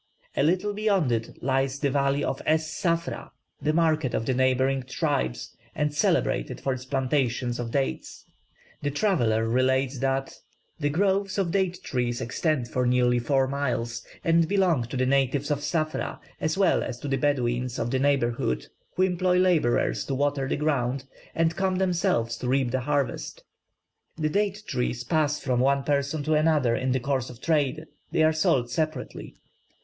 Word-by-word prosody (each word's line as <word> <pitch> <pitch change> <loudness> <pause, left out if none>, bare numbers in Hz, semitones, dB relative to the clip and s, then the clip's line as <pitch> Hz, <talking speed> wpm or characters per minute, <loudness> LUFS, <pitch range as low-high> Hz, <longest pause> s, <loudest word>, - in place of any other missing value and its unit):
A - - +1
little 185 +7 +1
beyond 200 - +1
it 115 -1 -3
lies 135 +1 +1
the 140 -1 0
valley 140 +1 +1
of 135 - -2
Es 155 0 +3
Ssafra, 170 +1 -2 0.3
the 150 +2 +1
market 155 -5 +1
of 115 - -1
the 130 - +1
neighbouring 130 +1 +2
tribes 65 - -2 0.2
and 150 -1 0
celebrated 145 - +1
for 135 - -1
its 130 0 -7
plantations 130 -2 0
of 120 -1 -3
dates. 135 +2 -3 0.6
The 145 - -1
traveller 130 - +1
relates 130 +2 +1
that 135 0 -1 0.5
"The 145 -1 +1
groves 195 +4 +1
of 190 -4 0
date 190 -2 0
trees 120 -2 -1
extend 130 +1 -1
for 125 +2 0
nearly 125 0 +3
four 135 +2 +1
miles, 120 -4 -2 0.2
and 165 0 +3
belong 180 -9 +2
to 125 +3 -5
the 130 - +2
natives 135 +2 +1
of 145 - +1
Ssafra 155 +1 -2 0.2
as 155 +3 -1
well 195 -3 +3
as 120 - -4
to - - -4
the 135 -1 0
Bedouins 125 -3 0
of 120 - -2
the 130 - +1
neighbourhood, 120 - +1 0.3
who 185 - +2
employ 180 0 +2
labourers 175 -10 +2
to 135 - -2
water 140 0 0
the - - 0
ground, 140 -3 0 0.3
and 165 0 +1
come 190 0 0
themselves 170 -11 +1
to 125 - -4
reap 130 -1 +1
the 130 - 0
harvest. 145 +1 -2 0.7
The 155 -1 0
date 205 +3 -1
trees 125 -2 -2
pass 150 +1 +1
from 125 -3 0
one 135 +2 +2
person 145 +1 0
to 155 +2 +1
another 150 -6 +3
in 130 0 -1
the 130 - +1
course 130 0 -1
of 125 -2 -11
trade; 155 0 0 0.3
they 160 - +2
are 155 0 +4
sold 155 -7 +1
separately. 155 +4 -3
140 Hz, 170 wpm, -26 LUFS, 125-160 Hz, 0.7 s, are